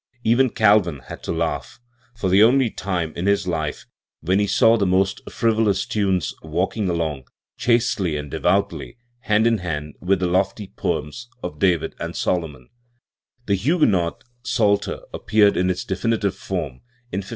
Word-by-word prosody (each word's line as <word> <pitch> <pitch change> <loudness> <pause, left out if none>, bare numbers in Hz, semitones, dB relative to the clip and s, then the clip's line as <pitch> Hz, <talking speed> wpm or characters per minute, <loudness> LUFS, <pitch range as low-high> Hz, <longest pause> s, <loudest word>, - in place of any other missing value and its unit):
Even 125 +3 +3
Calvin 100 - +3
had - - -8
to - - -4
laugh, 85 +6 -3 0.4
for 110 -5 -2
the 95 +2 +5
only 120 +1 +4
time 90 -5 -3
in 90 +3 -2
his 100 -1 +2
life 80 -4 -3 0.4
when 95 +5 +1
he 105 - +1
saw 115 +3 +4
the 100 -4 +1
most 95 +1 +1
frivolous 110 -4 +1
tunes 95 -5 0
walking 90 +6 -1
along, 80 -7 -2 0.3
chastely 115 -9 +1
and 75 -2 -6
devoutly, 65 - -1 0.2
hand 110 -1 +2
in 115 -2 +3
hand 75 -4 -4
with 95 0 +1
the 90 - 0
lofty 95 +3 -1
poems 120 +11 -3
of 75 -4 -6
David 90 -3 +1
and - - -5
Solomon, 75 -8 -2 0.8
The 100 - +1
Huguenot 100 - +1 0.2
Psalter 115 -5 0
appeared 105 -1 +3
in 90 +1 +1
its 90 - -2
definitive 100 +1 0
form 85 -10 -5 0.3
in 95 - -2
1562. 100 - -8
95 Hz, 155 wpm, -22 LUFS, 85-110 Hz, 0.8 s, the